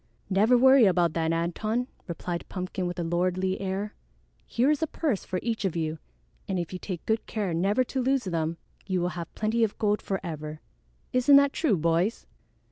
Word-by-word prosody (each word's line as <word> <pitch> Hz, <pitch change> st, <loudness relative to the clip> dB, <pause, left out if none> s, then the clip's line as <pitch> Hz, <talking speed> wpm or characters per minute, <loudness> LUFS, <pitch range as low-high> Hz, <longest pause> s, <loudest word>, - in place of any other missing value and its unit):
"Never 215 Hz, +6 st, +5 dB
worry 260 Hz, -1 st, +7 dB
about 175 Hz, -4 st, +3 dB
that, 165 Hz, -1 st, 0 dB
Antone," 215 Hz, +9 st, -1 dB, 0.2 s
replied 170 Hz, 0 st, -5 dB
Pumpkin 185 Hz, 0 st, -3 dB
with 175 Hz, -, -5 dB
a 175 Hz, -, -1 dB
lordly 185 Hz, +3 st, 0 dB
air. 195 Hz, +2 st, -3 dB, 0.5 s
"Here 255 Hz, +5 st, +2 dB
is 300 Hz, -, 0 dB
a 320 Hz, -, +1 dB
purse 285 Hz, -, -1 dB
for 185 Hz, -, -3 dB
each 230 Hz, -3 st, -2 dB
of 190 Hz, -4 st, -1 dB
you, 160 Hz, -1 st, -2 dB, 0.5 s
and 190 Hz, -, -1 dB
if 175 Hz, 0 st, -3 dB
you 180 Hz, -, -4 dB
take 180 Hz, -3 st, -6 dB
good 220 Hz, 0 st, 0 dB
care 205 Hz, -6 st, -2 dB
never 195 Hz, +9 st, +2 dB
to 260 Hz, +1 st, -3 dB
lose 265 Hz, +1 st, +1 dB
them, 165 Hz, -3 st, -2 dB, 0.3 s
you 185 Hz, -2 st, 0 dB
will 175 Hz, 0 st, 0 dB
have 170 Hz, -2 st, -6 dB
plenty 220 Hz, +2 st, +1 dB
of 215 Hz, -, 0 dB
gold 210 Hz, -1 st, +1 dB
forever. 155 Hz, -5 st, -4 dB, 0.5 s
Isn't 255 Hz, +3 st, +6 dB
that 280 Hz, 0 st, +6 dB
true, 260 Hz, -, +2 dB
boys?" 170 Hz, +7 st, +1 dB
190 Hz, 190 wpm, -27 LUFS, 170-230 Hz, 0.5 s, worry